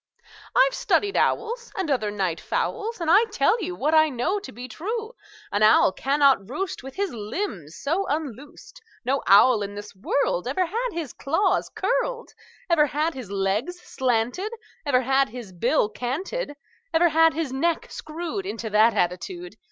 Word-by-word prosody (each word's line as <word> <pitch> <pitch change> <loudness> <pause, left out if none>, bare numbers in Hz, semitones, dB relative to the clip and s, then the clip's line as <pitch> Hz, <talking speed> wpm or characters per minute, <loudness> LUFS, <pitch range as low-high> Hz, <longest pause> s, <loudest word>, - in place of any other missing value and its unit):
"I've - - +5
studied 410 -4 +1
owls, 470 +2 0
And 370 -6 -1
other 215 -6 +1
night 190 -5 -2
fowls, 450 0 -2
And 335 - -3
I 425 +6 +6
tell 450 +1 +1
you 360 0 -3
What 300 +2 0
I 315 0 +6
know 275 +10 -1
to 405 - -10
be 245 +3 -8
true: 435 - -4 0.4
An 205 - 0
owl 215 -2 +6
cannot 275 -4 +2
roost 380 +7 -3
With 265 +1 -10
his 400 -3 -1
limbs 210 - -5
so 345 +7 -1
unloosed; 290 -2 -6 0.2
No 270 +2 +1
owl 210 +3 +6
in 205 0 -4
this 205 0 -9
world 190 0 0
Ever 325 +8 +1
had 460 +8 -2
his 325 -6 -4
claws 365 +7 0
curled, - - -2 0.3
Ever 320 -4 +4
had 305 +4 -1
his 255 -7 -8
legs 200 - -1
slanted, 255 - -1 0.4
Ever 255 -3 +3
had 270 +1 +2
his 235 -3 -9
bill 235 - +2
canted, 290 - -4 0.4
Ever 340 +1 +4
had 325 0 +4
his 310 -5 -2
neck 330 +5 -1
screwed 335 +5 -5
Into 225 - -5
that 215 +2 +5
attitude. 345 - -2
290 Hz, 165 wpm, -24 LUFS, 230-370 Hz, 0.4 s, I